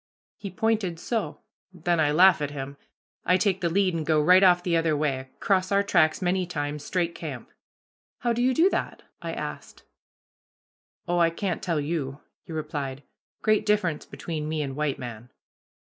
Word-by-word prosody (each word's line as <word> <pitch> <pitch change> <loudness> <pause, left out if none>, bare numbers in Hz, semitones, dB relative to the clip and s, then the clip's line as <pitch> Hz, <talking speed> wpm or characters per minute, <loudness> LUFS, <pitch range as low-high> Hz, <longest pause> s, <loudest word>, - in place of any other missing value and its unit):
"He 200 - -7
pointed 195 -3 -1
so. 225 +3 -3 0.3
Then 175 -1 -1
I 150 -2 +3
laugh 180 +2 +6
at 145 - -1
him. 140 -1 -6 0.5
I 180 - +4
take 190 0 +1
the 170 - +1
lead 190 +1 +2
and 165 -1 -2
go 155 0 +2
right 180 +5 +6
off 180 -2 +5
the 175 -2 +1
other 165 -2 +2
way, 135 -3 -1
cross 185 -1 +1
our 200 0 +3
tracks 160 -3 +2
many 180 0 +1
times, 145 -3 -4
straight 175 0 -1
camp." - - -7 0.7
"How 240 -1 +1
do 235 - -1
you 255 +1 +2
do 335 +3 +5
that?" - - -3 0.2
asked - - -6 1.2
I. - - -2
"Oh, 175 - +2
I 170 -1 +5
can't 180 +1 -3
tell 165 -4 -1
you," 145 -2 -3 0.2
he - - -13
replied. 145 -3 -4 0.4
"Great 215 -1 +3
difference 195 -7 0
between 155 -2 -5
me 155 -1 -1
and 135 -2 -5
white 150 -2 -1
man." 120 -2 -8
170 Hz, 175 wpm, -26 LUFS, 150-185 Hz, 1.2 s, laugh